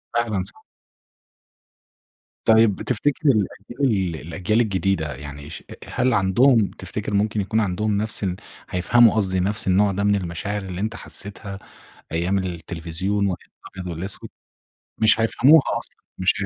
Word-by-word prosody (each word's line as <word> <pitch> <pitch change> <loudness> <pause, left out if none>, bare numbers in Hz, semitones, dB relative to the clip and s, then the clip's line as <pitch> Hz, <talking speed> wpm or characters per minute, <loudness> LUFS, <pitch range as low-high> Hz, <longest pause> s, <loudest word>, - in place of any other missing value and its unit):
فعلًا 110 -5 0
صح. - - -9 1.8
طيب 110 -3 +4
تفتِكر 145 +5 +1
الأجيال 105 - 0
الأجيال 105 +7 +1
الجديدة، 95 -7 0
يعني 75 +1 -9
ش 80 - -7
أ - - -8
هل 125 0 +1
عندهم، 110 +3 +4
تفتِكر 105 - -4
ممكن 105 +1 +1
يكون 110 +3 0
عندهم 105 +1 0
نفس 110 +1 -2
الن 90 -2 0 0.3
هيفهَموا 110 +6 +4
قصْدي 95 -3 +1
نفْس 100 +2 -1
النوع 100 +2 +4
ده 100 +1 -2
من 105 0 +3
المشاعر 95 +3 -3
اللي 95 0 -5
أنت 110 +2 -2
حسّيتها 100 -2 -7 0.5
أيام 85 +4 0
التلفزيون، 90 +3 -2
وأيام 90 - -5 0.2
الأبيض 95 -1 -6
والأسود؟ 90 +4 -5 0.7
مش 110 0 +5
هيفهَموها 135 +8 +6 0.2
أصلًا، - - -6 0.2
مش 95 0 +3
هي - - 0
100 Hz, 140 wpm, -23 LUFS, 90-110 Hz, 1.8 s, هيفهَموها